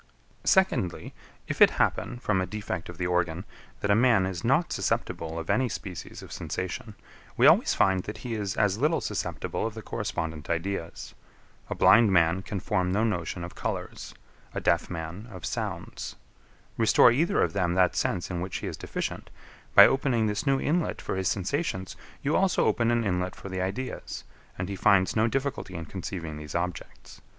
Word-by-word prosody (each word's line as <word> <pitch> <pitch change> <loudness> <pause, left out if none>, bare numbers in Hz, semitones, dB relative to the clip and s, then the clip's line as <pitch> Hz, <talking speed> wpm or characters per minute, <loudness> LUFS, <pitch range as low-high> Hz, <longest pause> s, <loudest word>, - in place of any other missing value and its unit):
15. - - -26
Secondly. 160 - +2 0.3
If - - -4
it - - +10
happen, 120 - 0
from 105 -6 0
a 95 - -2
defect 100 -4 -5
of 90 - -9
the 90 - -2
organ, 90 0 0 0.4
that 100 - +1
a - - +5
man 115 -4 +4
is 95 0 -4
not 135 +8 +2
susceptible 80 0 -2
of 80 0 -5
any 130 -1 +2
species 95 -4 -7
of - - -12
sensation, 95 +3 -5 0.4
we - - +5
always - - +6
find 95 -1 +3
that 105 - -6
he 120 - -3
is 100 -3 -3
as 105 -1 +2
little 155 +5 +2
susceptible - - -3
of 115 - -7
the 110 - -7
correspondent 80 -5 -4
ideas. 85 +1 -3 0.6
A - - -2
blind 115 -3 +6
man 85 0 +3
can 95 +1 -4
form 90 -2 0
no 105 +4 +2
notion 90 -5 -2
of 85 - -7
colours; - - -5 0.4
a - - 0
deaf 85 - +1
man 85 +5 -6
of 95 -5 -8
sounds. - - -4 0.6
Restore 115 +1 +6
either 155 +8 +2
of - - -1
them 90 -3 0
that 90 -1 +3
sense 90 - -1
in 85 -1 -3
which 90 0 -3
he - - -6
is - - -5
deficient; - - -4 0.5
by - - +11
opening 130 -4 +2
this 105 +6 -2
new 135 0 +3
inlet 165 +5 0
for - - -3
his 95 -1 -1
sensations, 95 - -2 0.3
you 145 +3 +1
also 190 -1 +3
open 115 -1 +2
an 120 0 +2
inlet 90 -2 -1
for 100 - -9
the 95 -1 -3
ideas; 100 +8 -4 0.3
and 90 - -3
he 100 - -4
finds 95 0 +3
no 110 +1 +3
difficulty 135 -7 -2
in 85 -1 -5
conceiving 85 -3 -6
these 75 -1 -8
objects. 90 0 -5
95 Hz, 185 wpm, -27 LUFS, 90-115 Hz, 0.6 s, by